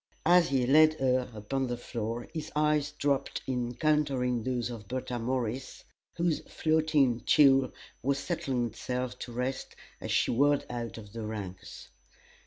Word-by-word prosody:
As 175 0 +5
he 130 -2 +2
led 155 +4 +6
her 130 -3 +1
upon 125 +5 -3
the 120 0 -3
floor 120 0 -4
his 160 -1 -5
eyes 150 -1 +2
dropped 145 -2 -1
in 125 -2 -1
encountering 130 -2 +1
those 125 0 -2
of 110 -4 -8
Bertha 125 0 -3
Morris, 125 +1 -3 0.3
whose 170 -2 +1
floating 155 -6 +2
tulle 135 -3 +5 0.3
was 140 +2 +1
just - - -7
settling 135 -8 -1
itself 125 +2 -4
to 120 - -6
rest 125 +2 -3 0.2
as - - -5
she - - +2
whirled 145 +4 +3
out 120 -2 -5
of 105 -2 -11
the 115 -1 -5
ranks. 100 -4 -7
130 Hz, 155 wpm, -30 LUFS, 120-145 Hz, 0.3 s, led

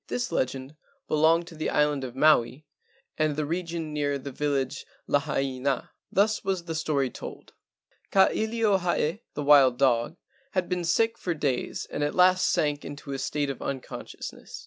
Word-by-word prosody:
This 245 -6 -2
legend 130 -1 -2 0.3
belonged 160 +2 +3
to 165 - -12
the 155 - -2
island 150 -2 +1
of 125 -1 -6
Maui 140 -1 +3 0.5
and 155 -1 +2
the 150 0 -1
region 165 -1 -3
near 145 -1 0
the 140 +1 -7
village 140 -1 -1 0.2
Lahaina. 135 -1 -1 0.2
Thus 210 +2 +2
was 190 -2 -1
the 165 -1 -5
story 145 -5 0
told: - - -9 0.6
Ka 190 -1 +5
ilio 220 -3 +1
hae 175 +2 0
(the 145 - -2
wild 140 -4 +6
dog) 130 +4 +2 0.4
had 185 -2 0
been 180 -1 -2
sick 225 +7 +2
for 175 -2 -2
days 140 -5 -2
and 145 - -2
at 145 - -1
last 185 0 +5
sank 145 -1 0
into 140 0 -8
a 135 - -3
state 145 0 -1
of 135 - -8
unconscious¬ 135 -2 -6
ness. - - -11
150 Hz, 170 wpm, -27 LUFS, 140-175 Hz, 0.6 s, wild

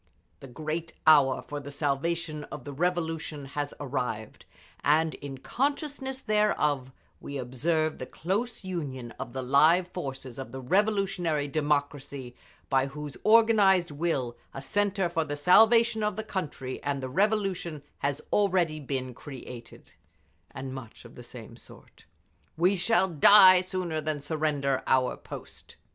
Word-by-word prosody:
The 135 - -10
great 155 +5 -5
hour 145 -4 +5
for 145 - -6
the 145 0 -9
salvation 150 +2 -2
of 145 - -9
the 145 +2 -7
Revolution 165 -2 -2
has 145 -1 -2
arrived, 125 -6 -4 0.4
and 155 +2 +3
in 140 -1 -8
consciousness 270 - -2
thereof 150 - +1 0.3
we 140 - -6
observe 155 +5 -1
the 130 - -6
close 215 +8 -2
union 140 -10 -5
of 120 - -6
the 130 -1 -4
live 160 +7 +4
forces 135 -7 -6
of 135 - -7
the 130 - -6
revolutionary 185 - +1
democracy, 145 -3 -2 0.3
by 135 0 +2
whose 145 +1 -7
organised 210 -6 +5
will 140 -6 -2 0.2
a 135 - -5
centre 200 +1 0
for 165 -1 -1
the 145 -1 -4
salvation 225 +8 +5
of 210 -2 0
the 220 - -4
country 150 -10 -5
and 140 -1 -2
the - - -2
Revolution 190 -2 0 0.2
has 140 0 -2
already 180 -6 +2
been 130 -3 -4
created…." 125 -3 -11 0.6
And 130 0 -7
much 130 -4 -10
of - - -13
the - - -11
same - - -11
sort. - - -16 0.5
"We 180 +4 +3
shall 190 +1 +2
die 185 +2 +8
sooner 180 -4 -3
than 155 -1 -2
surrender 145 -2 -1
our 130 -1 +2
post!" - - -11
155 Hz, 140 wpm, -28 LUFS, 135-185 Hz, 0.6 s, die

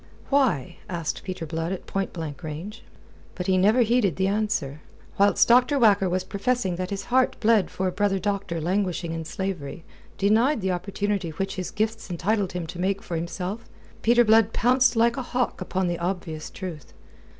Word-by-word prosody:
"Why?" 260 - +2
asked 170 -4 -3
Peter 185 -3 -5
Blood 165 +2 -3
at 190 - -5
point 195 -1 -2
blank 160 -4 -6
range. 175 +9 -7 0.5
But 180 - -4
he 190 - +2
never 210 +7 +4
heeded 225 - +2
the 190 - 0
answer. 195 -8 -1 0.4
Whilst 200 +1 +5
Dr. 250 +4 +5
Whacker 205 -6 +4
was 185 +1 0
professing 200 0 -1
that 185 0 -3
his 200 -1 -4
heart 260 0 +3
bled 220 -3 +3
for 190 - -2
a - - 0
brother 200 0 +1
doctor 200 -3 -2
languishing 180 0 -1
in 165 -1 -4
slavery, 175 -4 -4 0.3
denied 225 +7 +3
the 190 0 0
opportunity 195 0 -2
which 195 +5 -3
his 185 -2 -4
gifts 220 0 -2
entitled 190 +2 0
him 180 -2 -3
to 175 +2 -8
make 195 +2 0
for 170 - -4
himself, 180 +6 -4 0.3
Peter 240 +1 +5
Blood 220 0 +4
pounced 255 0 +3
like 235 +2 +3
a - - -1
hawk 250 -4 -2
upon 185 0 -1
the 175 -1 -2
obvious 170 -3 -3
truth. 170 -8 -8
195 Hz, 180 wpm, -25 LUFS, 175-220 Hz, 0.5 s, Whilst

